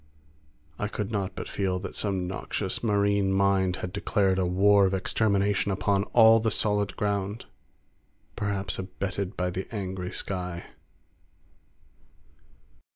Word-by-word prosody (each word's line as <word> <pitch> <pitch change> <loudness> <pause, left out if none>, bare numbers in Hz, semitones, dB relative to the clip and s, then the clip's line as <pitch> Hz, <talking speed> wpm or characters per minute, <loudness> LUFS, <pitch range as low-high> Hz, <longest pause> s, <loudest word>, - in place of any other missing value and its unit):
I 105 - -1
could 105 0 -4
not 100 -3 -2
but - - -5
feel 95 -2 -1
that 95 - -7
some 95 -3 -1
noxious 95 +1 -3
marine 100 -3 +2
mind 95 -1 +2
had 90 - -8
declared 100 -2 +1
a 90 - +1
war 100 +2 +5
of 95 - 0
extermination 100 0 +1
upon 100 +1 +1
all 115 -1 +6
the 110 0 +1
solid 105 -1 0
ground, 100 +1 -2 0.9
perhaps 100 -3 -2
abetted 95 +1 -4
by 90 0 -1
the 95 +2 -4
angry 95 -4 -4
sky. 90 -3 -4
100 Hz, 125 wpm, -27 LUFS, 95-105 Hz, 0.9 s, all